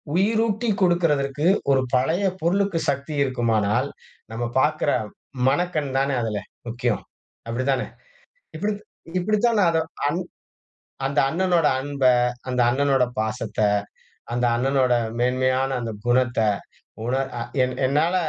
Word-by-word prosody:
உயிரூட்டிக் 215 +1 +1
கொடுக்கறதற்கு, 150 -5 +1 0.3
ஒரு 135 -1 +4
பழைய 160 +10 +1 0.2
பொருளுக்கு 185 0 +1
சக்தி 140 +2 -2
இருக்குமானால், 115 -5 +1 0.5
நம்ம 120 +2 -3 0.2
பாக்கிற 150 +1 +1 0.6
மனக்கண் 150 -3 -1
தானே 140 0 +1
அதில 105 -2 -2 0.3
முக்கியம். 120 -1 -1 0.4
அப்படி 120 +3 -2
தானே! 135 - -1 0.7
இப்படி 205 +4 -1 0.5
இப்படித்தான் 215 +3 +2
நான் 170 -3 +4
அதை 160 - +2 1.3
அந்த 140 +2 -2
அண்ணனோட 175 -1 +2
அன்ப, 140 -1 -3 0.4
அந்த 125 -1 0
அண்ணனோட 135 -1 +2
பாசத்த, 110 0 -3 0.8
அந்த 120 +1 +1
அண்ணனோட 130 0 +2 0.3
மேன்மையான 130 +2 +1
அந்த 115 -1 -3
குணத்த, 120 -1 +2 0.7
உணர் 130 +2 0
அ - - -3 0.2
என் 125 - -1
என்னால 155 +6 +2
140 Hz, 110 wpm, -23 LUFS, 125-170 Hz, 1.3 s, ஒரு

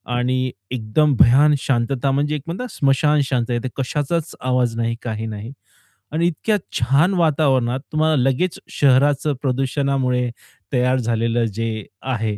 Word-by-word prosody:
आणि 130 +1 0 0.2
एकदम 130 +5 +1
भयान 145 +5 +6
शांतता 135 +2 0
म्हणजे 145 +2 0
एक 150 - -4
म्हणता 190 +10 -4
स्मशान 145 +2 +2
शांतता 120 -1 -1
कशाचाच 150 +4 -2
आवाज 125 -2 0
नाही, 115 0 -1
काही 110 -2 -4
नाही. 110 +2 -7 0.6
आणि 165 +2 +1
इतक्या 210 +6 0 0.2
छान 140 +10 +3
वातावरणात 140 -7 +2
तुम्हाला 155 0 +2
लगेच 135 +7 0
शहराचं 145 +2 +3
प्रदूषणामुळे 130 -1 0 0.4
तयार 125 0 +2
झालेलं 115 0 0
जे 110 -1 -3 0.2
आहे 110 -5 -2
130 Hz, 125 wpm, -20 LUFS, 120-150 Hz, 0.6 s, भयान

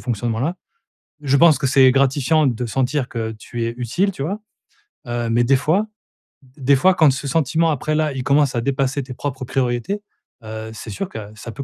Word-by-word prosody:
fonctionnement-là. 120 - -2 0.7
Je 140 -1 +2
pense 160 -3 +6
que 140 - 0
c'est 130 -1 +6
gratifiant 140 +3 +2
de 120 0 -2
sentir 130 +3 -1
que 110 -2 -4
tu 115 +2 -6
es 115 - -1
utile, 180 - 0
tu 135 - -6
vois? 195 +8 -3 0.7
Heu, 120 -1 -2
mais 120 +1 +3
des 135 +2 +4
fois 175 +10 +1 0.7
des 140 +1 +3
fois 185 +7 +4
quand 155 -4 +5
ce 140 +2 -4
sentiment, 160 +2 +1
après, 155 +2 -1
là 155 -2 0
il 130 -1 -4
commence 140 -1 +2
à 120 - 0
dépasser 135 +2 -1
tes 130 - -8
propres 130 0 -5
priorités, 130 - -1 0.4
heu, 110 0 -7
c'est 110 - -9
sûr 190 - -4
que 110 - -7 0.2
ça 115 +2 -8
peut 140 - -6
135 Hz, 195 wpm, -20 LUFS, 120-150 Hz, 0.7 s, pense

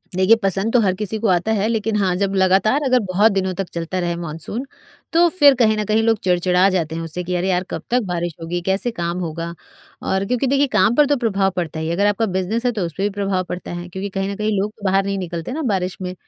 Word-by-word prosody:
देखिए, 190 +4 +5
पसंद 195 +3 0
तो 245 - +5
हर 190 -3 +2
किसी 210 +2 -4
को 225 - 0
आता 180 +4 +2
है 210 0 +1
लेकिन 225 -1 -1
हाँ, 190 -3 +1
जब 195 +1 -1
लगातार 195 +8 +3
अगर 255 -1 +4
बहुत 205 +4 +4
दिनों 190 -1 -1
तक 190 +1 -4
चलता 170 +2 -3
रहे 175 -1 -1
मानसून, 170 - -5 0.5
तो 340 +1 +5
फिर 290 -6 +5
कहीं 220 -3 +3
न 215 - 0
कहीं 215 +2 +2
लोग 225 -1 +3
चिड़चिड़ा 180 +1 +3
जाते 165 -4 -1
हैं 165 - -3
उससे, 165 +2 -5
कि 180 +1 -3
अरे, 180 +2 0
यार 180 0 +1
कब - - -4
तक 250 +1 +2
बारिश 175 -2 -2
होगी, 175 +2 -3
कैसे 190 +6 0
काम 170 -4 -3
होगा? 170 0 -4 0.5
और 190 +1 -1
क्योंकि 250 +5 0
देखिए 280 +2 +3
काम 220 +2 +4
पर 295 - +5
तो 290 0 +1
प्रभाव 200 -5 +1
पड़ता 160 -3 -3
ही 160 - -3
है 170 - -1
अगर 200 +3 +2
आपका 205 +2 +1
बिज़नेस 195 +5 -2
है, 245 - +3
तो 205 -6 -2
उस 165 - -6
पर 195 - -1
भी 205 - +2
प्रभाव 195 -2 -1
पड़ता 180 - -5
है, 175 0 -6
क्योंकि 190 +3 -5
कहीं 195 0 -2
न 200 - -4
कहीं 215 0 0
लोग 210 +2 -2
बाहर 195 +1 +3
नहीं 200 0 -1
निकलते 175 0 -5
ना 305 +5 -3
बारिश 185 -1 -2
में 180 0 -4
195 Hz, 260 wpm, -20 LUFS, 180-220 Hz, 0.5 s, देखिए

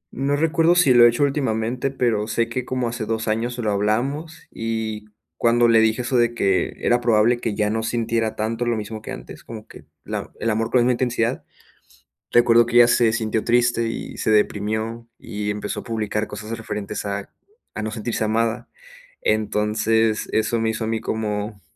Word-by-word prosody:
No 140 +2 0
recuerdo 165 +2 +3
si 170 -8 +5
lo 120 -1 +8
he - - +8
hecho 120 +5 0
últimamente, 130 -2 0
pero 115 -5 0
sé 115 +1 0
que 125 +1 -4
como 130 -2 -2
hace 115 -2 -4
2 115 0 -2
años 115 +3 -1
lo 110 -3 -1
hablamos, 135 +11 -2
y 110 -2 -4 0.3
cuando 120 0 +3
le 115 -1 +5
dije 110 +2 +2
eso 125 0 0
de 120 0 +2
que 95 -3 +1
era 120 0 +2
probable 120 +1 +3
que 110 -4 -2
ya 105 0 0
no 110 0 -1
sintiera 115 -1 -1
tanto 115 +2 -2
lo 115 -2 +1
mismo 110 +1 -6
que - - -10
antes, - - -9
como 110 -1 -9
que - - -14 0.2
la - - -5
el 115 - 0
amor 115 +1 -1
con 125 - +2
la - - +4
misma 125 - +3
intensidad, 120 -1 -1 0.9
recuerdo 120 -1 +5
que 120 - -5
ella 120 0 +7
se 120 -1 +3
sintió 110 -1 -1
triste 120 -1 +2
y 115 - -6
se 110 - 0
deprimió, 110 +2 0
y 105 -1 -5
empezó 105 0 -3
a - - -8
publicar 110 -2 -2
cosas 105 +2 -6
referentes 105 -2 -5
a 100 0 -4 0.4
a 110 - -4
no 110 - -3
sentirse 110 0 -2
amada. 115 +2 0 0.5
Entonces, 110 +1 +1
eso 110 +1 +1
me 110 0 +1
hizo 110 0 -4
a - - -2
mí 115 0 -1
como 105 -1 -3
115 Hz, 195 wpm, -22 LUFS, 110-120 Hz, 0.9 s, lo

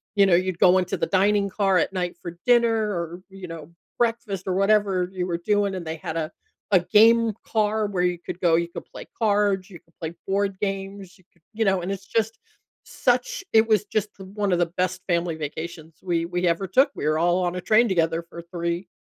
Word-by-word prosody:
you 200 -1 +6
know, 190 - +3
you'd 185 0 0
go 185 +1 +6
into 180 - -2
the - - 0
dining 200 +1 +2
car 195 -1 +2
at 180 - 0
night 180 -2 -3
for 170 0 -8
dinner 235 -2 +5 0.2
or, 170 -1 -4
you 190 -1 -9
know, 165 -2 -9 0.3
breakfast 225 -5 -1
or 185 - 0
whatever 195 -2 +2
you 180 -1 -2
were 170 -2 -1
doing, 200 +2 0
and 180 -2 -6
they 160 0 -4
had 160 +1 -5
a 160 0 -2 0.4
a 190 - +6
game 225 +4 +4
car 215 0 +1
where 195 -3 -2
you 180 -1 +1
could 175 - -7
go 170 -2 +4
you 170 +1 +1
could - - -8
play - - -11
cards, 205 -3 +1
you 175 -4 -11
could 165 - -34
play 160 0 -4
board 195 0 0
games, 195 -1 -5
you - - -23
could 175 - -32
you 225 +1 0
know, 190 -2 +2
and 185 - -3
it's 195 -1 -6
just 225 0 -1 0.4
such - - 0
it 220 0 +5
was 215 -3 +2
just 210 0 -1
one 195 +1 -3
of - - +2
the 175 - +3
best 185 0 -1
family 170 -2 0
vacations 160 +1 -7
we 170 -2 0
we 175 +1 -1
ever 170 +3 +1
took. 265 - +4
We - - -4
were 155 +1 +2
all 175 +2 +2
on 175 0 -2
a 180 - -4
train 220 +5 +4
together 165 -2 +1
for 170 - -8
3 170 +1 -3
185 Hz, 225 wpm, -24 LUFS, 175-205 Hz, 0.4 s, you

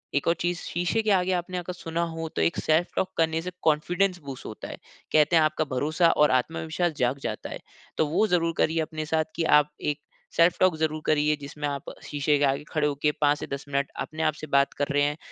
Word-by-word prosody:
एक 145 - 0
और 170 - +5
चीज़ 175 0 0
शीशे 175 +6 -1
के 215 -1 +1
आगे 185 -1 +3
आपने 180 +1 -2
अगर 180 0 -4
सुना 170 -1 -3
हो 165 0 -4
तो - - 0
एक 170 - +1
सेल्फ 160 +3 +2
टॉक 190 - 0
करने 160 0 +1
से 180 +2 -5
कॉन्फिडेंस 175 +4 +1
बूस्ट 135 -2 -8
होता 110 - -7
है, - - -7 0.4
कहते 155 +2 +5
हैं 160 - +6
आपका 155 0 +1
भरोसा 155 +6 +3
और 150 0 +4
आत्मविश्वास 160 +6 0
जाग 125 +2 +1
जाता 110 -1 -4
है। - - -6 0.4
तो 155 - +2
वो 190 +9 +2
ज़रूर 170 -3 +1
करिए 160 +1 +2
अपने 155 0 -4
साथ 160 0 +1
कि 170 - 0
आप 150 -1 +5
एक 150 0 -1 0.4
सेल्फ 170 +1 +5
टॉक 185 -3 +4
ज़रूर 155 0 -1
करिए, 150 0 +3
जिसमें 145 +1 -5
आप 140 -1 -4 0.2
शीशे 145 0 +1
के - - +1
आगे 140 +2 0
खड़े 150 -1 +1
हो 145 - 0
के 150 - +4
5 145 0 +4
से - - -5
10 140 0 -5
मिनट 140 0 0
अपने 160 +1 -4
आप 155 -2 +2
से 155 - -8
बात 140 0 +3
कर 145 - 0
रहे 145 - +3
हैं। 145 +1 0
155 Hz, 240 wpm, -26 LUFS, 145-170 Hz, 0.4 s, हैं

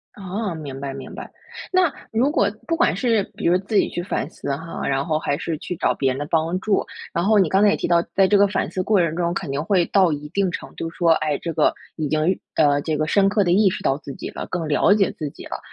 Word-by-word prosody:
哦， 195 -1 -4
明 140 -4 -7
白， 135 -1 -4
明 135 - -9
白。 - - -8 0.4
那 365 -5 +3 0.2
如 250 +6 +2
果 200 -9 +2 0.2
不 330 - +1
管 340 - +2
是 230 -5 +2
比 - - -6
如 175 +1 +4
自 200 +3 -5
己 - - +4
去 175 - -4
反 175 -6 -2
思 140 -4 -4
哈， 165 +3 -6
然 135 +1 0
后 155 -2 0
还 145 -2 -1
是 165 - -3
去 180 - -5
找 - - +1
别 135 - 0
人 130 - -4
的 145 - -3
帮 165 +4 0
助， 205 0 +1 0.3
然 170 - 0
后 215 +1 +4
你 190 -4 +4
刚 195 +1 +3
才 210 - +6
也 - - +3
提 - - -2
到， 170 -1 +4
在 195 -1 +5
这 205 - +3
个 200 0 +5
反 195 - -1
思 185 - -2
过 205 0 +2
程 165 -2 +1
中 170 0 0
肯 170 -5 -4
定 140 +2 -2
会 185 -1 +2
到 190 -5 +3
一 150 0 -4
定 195 +2 0
程 - - -7
度 165 - -4
说， 170 0 +2
哎， 155 -2 0
这 170 - -5
个 - - +3 0.3
已 155 -2 -1
经 155 +5 +1 0.2
呃， 145 -2 +3
这 155 -1 -2
个 155 - 0
深 195 +3 +3
刻 205 0 +2
地 175 - +1
意 200 +1 +5
识 - - -5
到 135 - +2
自 140 - -8
己 - - -6
了， - - -6
更 170 -3 -3
了 150 +6 +3
解 200 -3 +2
自 150 - -5
己 - - -12
了。 - - -6
170 Hz, 300 characters per minute, -22 LUFS, 155-200 Hz, 0.4 s, 才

